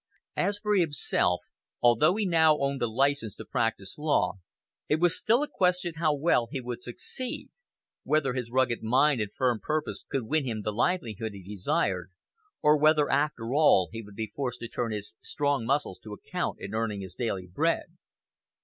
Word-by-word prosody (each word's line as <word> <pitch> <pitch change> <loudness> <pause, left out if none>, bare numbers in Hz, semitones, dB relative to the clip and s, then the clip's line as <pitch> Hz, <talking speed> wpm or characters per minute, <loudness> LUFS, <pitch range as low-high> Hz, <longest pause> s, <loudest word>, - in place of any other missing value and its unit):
As 200 +1 +1
for 210 0 0
himself, 145 - +2 0.4
although 120 - +4
he 215 -1 0
now 160 -4 +5
owned 140 -2 -1
a 120 - +2
license 135 -1 0
to - - -9
practise 115 0 -2
law, 100 -11 +1 0.5
it 150 - +2
was 175 0 +3
still 235 +6 +2
a - - -2
question 180 - +1
how 160 -1 +2
well 140 -5 +2
he 135 - -3
would 120 -1 -6
succeed 240 - -5 0.5
whether 145 -4 +1
his 125 -2 -3
rugged 125 -1 +1
mind 130 +3 +3
and 105 -1 -3
firm 125 -2 0
purpose 155 +5 -2
could 135 - -1
win 155 +6 0
him 110 -5 -3
the 105 - -2
livelihood 115 - -1
he 100 -2 -10
desired, 100 - -1 0.5
or 150 0 +5
whether, 155 -1 +4
after 135 -4 0
all, 140 - +5
he 115 - -5
would 105 -2 -13
be 110 0 -5
forced 125 -2 -3
to 120 - -4
turn 115 0 -3
his 105 -3 -5
strong 140 -5 0
muscles 140 -8 0
to 105 - -9
account - - -3
in 100 - -7
earning 110 -2 -1
his 95 -2 -7
daily 95 -3 -2
bread. 90 0 0
125 Hz, 180 wpm, -28 LUFS, 110-155 Hz, 0.5 s, now